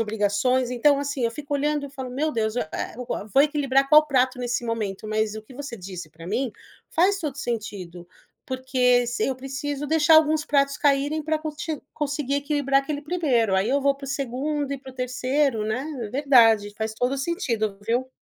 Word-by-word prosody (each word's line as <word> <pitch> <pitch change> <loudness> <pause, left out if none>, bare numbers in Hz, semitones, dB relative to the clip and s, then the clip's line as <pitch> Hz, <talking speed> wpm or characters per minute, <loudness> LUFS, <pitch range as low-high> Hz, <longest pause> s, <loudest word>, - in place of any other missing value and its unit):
obrigações. 220 +4 +1
Então, 275 +4 +3
assim, 280 -3 -2
eu 230 - +1
fico 285 +5 -7
olhando 295 0 0
e - - -12
falo: 265 -2 -7
“Meu 290 +5 -1
Deus, 220 0 -1
eh, 155 - -2 0.3
o 250 - -6 0.3
vou 275 - +7
equilibrar 275 -2 +2
qual 305 +1 +7
prato 260 -2 +2
nesse 245 -1 -2
momento?”. 215 -3 -3
Mas 215 0 0
o 215 - -7
que 255 - -15
você 285 -2 -6
disse 180 -4 -8
pra 165 +2 -12
mim 235 +7 -1 0.4
faz 385 +4 +3
todo 300 -6 -4
sentido. 200 - -5 0.4
Porque, 255 -1 +2
s 240 0 -2
eu 265 - 0
preciso 270 +2 -4
deixar 320 +1 +4
alguns 310 0 +4
pratos 280 -1 +2
caírem 285 +2 +2
pra 315 +1 0
conti 305 0 -4
conseguir 285 -2 -2
equilibrar 285 -1 +1
aquele 290 +1 -4
1º, 280 - +1
aí 190 +3 +2
eu 275 +3 +2
vou 280 0 +3
pro 275 0 -10
2º 275 +2 -2
e 280 - -3
pro 265 0 -11
3º, 255 -1 0
né? 245 +5 -2 0.3
Verdade. 230 -6 +4
Faz 220 0 -3
todo 250 +3 0
o 275 - -2
sentido, 235 - -1
viu? 245 +3 0
265 Hz, 190 wpm, -24 LUFS, 230-290 Hz, 0.4 s, vou